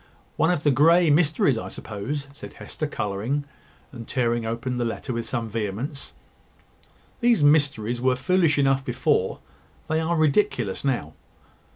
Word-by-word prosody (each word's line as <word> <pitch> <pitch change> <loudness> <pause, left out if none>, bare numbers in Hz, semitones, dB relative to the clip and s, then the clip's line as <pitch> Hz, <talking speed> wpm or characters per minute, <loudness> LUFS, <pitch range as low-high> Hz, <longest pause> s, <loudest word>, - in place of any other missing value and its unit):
"One 160 - +2
of 175 -5 0
the 145 - +4
Grey 165 +5 +5
mysteries, 145 -5 +2
I - - -6
suppose," 125 +8 -5
said - - -10
Hester, 155 - -5
colouring, 115 +4 -2 0.5
and 115 -4 -9
tearing 120 -2 0
open 115 +2 -3
the - - +1
letter 120 +2 -3
with 115 0 -4
some 115 -3 -2
vehemence: 115 +6 -4 1.1
"These 235 - +3
mysteries 135 -6 +2
were 130 0 +2
foolish 170 +3 +2
enough 135 -1 +2
before; 130 -4 0 0.5
they 160 0 0
are 165 +2 0
ridiculous 150 - +1
now. 120 - -1
135 Hz, 145 wpm, -24 LUFS, 115-150 Hz, 1.1 s, Grey